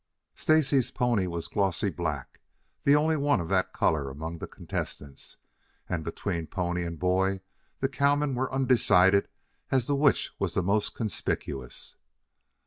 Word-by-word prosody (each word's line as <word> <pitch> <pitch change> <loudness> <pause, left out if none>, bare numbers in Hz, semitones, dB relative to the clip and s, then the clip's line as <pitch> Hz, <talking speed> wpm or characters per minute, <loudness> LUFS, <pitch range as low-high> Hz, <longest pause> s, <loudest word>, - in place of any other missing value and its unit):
Stacy's 145 -5 +3
pony 120 -7 +1
was 85 -1 -4
a - - -11
glossy 95 -6 0
black, - - -4 0.5
the 140 - +6
only 155 +2 +3
one 145 -5 +2
of 85 -1 -4
that 95 -1 +1
color 70 -4 +1
among 80 +5 -6
the - - -5
contestants, 70 -2 -6 0.5
and 85 -3 -2
between 85 0 -3
pony 90 -1 -2
and 85 -1 -5
boy 95 +2 +1 0.4
the 135 - +3
cowmen 140 +1 +1
were 130 +1 -1
undecided 100 -7 +4 0.4
as 130 -3 +2
to 145 - 0
which 140 0 +3
was - - -1
the 90 - +1
most 100 +3 +1
conspicuous. 70 - -4
100 Hz, 145 wpm, -28 LUFS, 85-135 Hz, 0.5 s, the